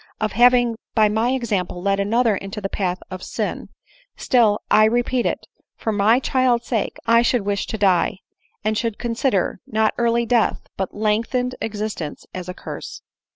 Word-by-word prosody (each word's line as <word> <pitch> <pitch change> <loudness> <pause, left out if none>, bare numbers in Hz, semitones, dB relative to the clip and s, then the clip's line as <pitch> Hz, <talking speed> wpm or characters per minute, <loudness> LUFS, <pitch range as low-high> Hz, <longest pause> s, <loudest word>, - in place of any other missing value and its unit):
of 215 -1 -1
having 240 +1 +4 0.2
by 215 -2 +5
my 220 +3 +1
example 210 -9 -1
led 195 +2 0
another 225 +2 +2
into 195 +2 -6
the 200 - -3
path 185 -2 -2
of 185 0 -6
sin - - -4 0.2
— - - -30
still, 225 -5 +3
1 215 0 +6
repeat 245 +1 +1
it, - - -3 0.3
for 220 - -2
my 215 +4 +4
child's 255 -3 +1
sake, 225 -4 -2
I 230 0 +5
should 240 -2 +1
wish 200 0 -1
to 220 - -4
die, 190 -3 +2 0.5
and 215 +1 0
should 225 -1 -2
consider, 230 -6 0
not 220 0 +1
early 235 0 +2
death, 235 -1 +2
but 190 -2 -4
lengthened 225 +4 0
existence, 210 -8 -4
as 180 -1 -6
a - - -4
curse." - - -8
220 Hz, 170 wpm, -21 LUFS, 200-240 Hz, 0.5 s, 1